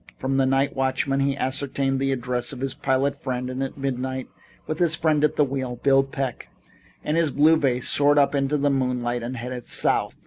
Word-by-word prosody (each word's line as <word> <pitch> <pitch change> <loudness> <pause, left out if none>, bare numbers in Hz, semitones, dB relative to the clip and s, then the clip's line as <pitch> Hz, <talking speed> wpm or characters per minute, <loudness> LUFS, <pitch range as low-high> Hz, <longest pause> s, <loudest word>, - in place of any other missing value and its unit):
From 135 +1 -1
the 135 -1 +3
night 135 +1 +1
watchman 135 +1 0
he 140 0 0
ascertained 135 0 -1
the 135 0 0
address 125 -1 -1
of - - -7
his 135 0 -3
pilot 135 +2 -1
friend 125 -1 -3
and 130 +1 -4
at 135 +1 -4
midnight, 130 -1 -3 0.4
with 155 - -4
his 170 -3 +3
friend 155 -2 +1
at 150 - +2
the 150 - +4
wheel, 130 -2 -3
Bill 135 +2 +3
Peck 135 -2 -5 0.5
and 150 - -1
his 165 -2 +2
blue 150 +4 +4
vase 130 -5 0
soared 145 0 +4
up 145 0 +4
into 140 +1 +1
the 145 0 +1
moonlight 125 -2 -1
and 125 +2 -5
headed 125 0 -6
south. - - +1
135 Hz, 205 wpm, -24 LUFS, 130-140 Hz, 0.5 s, the